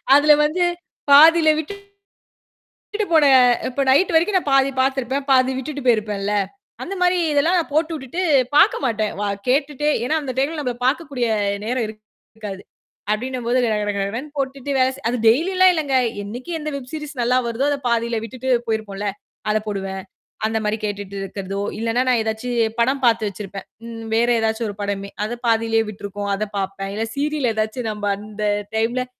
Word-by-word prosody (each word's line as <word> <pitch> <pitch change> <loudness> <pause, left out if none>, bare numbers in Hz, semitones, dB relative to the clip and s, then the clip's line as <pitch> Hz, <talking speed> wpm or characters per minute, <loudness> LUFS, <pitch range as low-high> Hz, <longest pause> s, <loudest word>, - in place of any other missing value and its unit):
அதுல 300 +1 +6
வந்து 340 +4 0 0.5
பாதியில 320 +2 +8
விட்டுட் 400 +6 -6 1.0
விட்டுட்டு 425 -1 -3
போன 310 -3 +6 0.4
இப்ப 275 +2 -1
நைட்டு 325 +6 +4
வரைக்கும் 355 +5 +3
நான் 295 - -4
பாதி 270 0 +4
பாத்துருப்பேன். 270 +1 0
பாதி 260 0 +4
விட்டுட்டு 285 +2 -5
போயிருப்பேன்ல. 210 -3 +1 0.5
அந்த 390 - -4
மாரி 360 0 +3
இதெல்லாம் 320 +5 +3
நான் 315 -4 -3
போட்டுவுட்டுட்டு 315 0 -1 0.3
பாக்க - - +6
மாட்டேன். 220 -3 0
வ - - -1 0.3
கேட்டுட்டே 295 +2 +1
ஏன்னா, 310 +5 +1
அந்த 265 - -4
டைம்ல 295 +4 0
நம்மளல 250 -4 -3
பார்க்கக்கூடிய 275 -4 0 0.4
நேரம் 240 +1 -1
இருக்காது. 215 -2 -11 0.5
அப்பிடின்னம்போது 245 +2 -1
கடகட 210 -2 0
கடகடன்னு 225 +9 -3
போட்டுட்டு, 275 +1 -3 0.4
அது 245 0 -1
டெய்லி 320 +12 +3
எல்லாம் 370 0 +7
இல்லைங்க. 285 -5 0 0.3
என்னைக்கு 245 +10 -7
எந்த 305 0 -4
வெப் 255 -2 -9
சீரீஸ் 300 -1 -6
நல்லா 250 +2 +2
வருதோ, 235 +4 -1
அதைப் 275 -3 -3
பாதியில 235 -1 0
விட்டுட்டு 255 +3 -5 0.2
போயிருப்போம்ல, 210 -2 -2 0.4
அதைப் 215 0 0
போடுவேன். 195 -1 -4 0.4
அந்த 220 0 0
மாரி 210 +1 0
கேட்டுட்டு 200 -1 -4
இருக்கறதோ, 195 0 -5 0.2
இல்லைன்னா, 230 +3 0
நான் 240 -2 +3
ஏதாச்சும் 225 0 -1
படம் 265 +3 +1
பாத்து 225 -2 +2
வச்சிருப்பேன். 195 0 -8 0.2
ம் 225 -1 -8
வேற 235 +2 +3
ஏதாச்சும் 220 +1 -1
ஒரு 200 - -7
படமே 200 0 -3 0.2
அதைப் 240 +2 -7
பாதியில 225 0 +2
விட்டுருக்கும். 205 0 -6
அதைப் 210 0 -5
பார்ப்பேன். 195 0 -4
இல்ல, 225 - -1
சீரியல் 290 -3 0
ஏதாச்சும், 220 +2 -2
நம்ம 205 -1 -2
அந்த 210 0 -8 0.3
டைம்ல 240 +3 0
240 Hz, 160 wpm, -21 LUFS, 215-285 Hz, 1.0 s, பாதியில